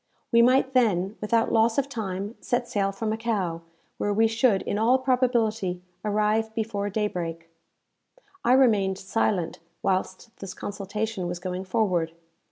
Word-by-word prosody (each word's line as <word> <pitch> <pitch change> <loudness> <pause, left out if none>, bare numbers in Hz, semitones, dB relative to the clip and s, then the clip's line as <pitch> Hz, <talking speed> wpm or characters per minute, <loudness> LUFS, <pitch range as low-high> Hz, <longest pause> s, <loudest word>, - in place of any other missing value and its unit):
We 235 -1 +6
might 260 +2 +4
then, 205 -6 +2
without 225 +2 +1
loss 225 0 +3
of 280 -1 +2
time, 205 -5 -4
set 245 0 -1
sail 200 -4 0
for 195 +3 -6
Macao, 215 -6 -1 0.4
where 205 - 0
we 220 +2 +3
should, 225 -2 +2
in 205 - -2
all 240 +4 +4
probability, 230 -8 0 0.2
arrive 215 +1 +1
before 210 -3 -2
daybreak. 170 -6 -3 0.9
I 245 - +4
remained 210 -8 +4
silent 190 -3 -1 0.2
whilst 190 +4 -2
this 195 -2 -8
consultation 205 -1 -4
was 175 0 -3
going 180 +1 -4
forward. 185 -5 0
210 Hz, 140 wpm, -26 LUFS, 190-230 Hz, 0.9 s, We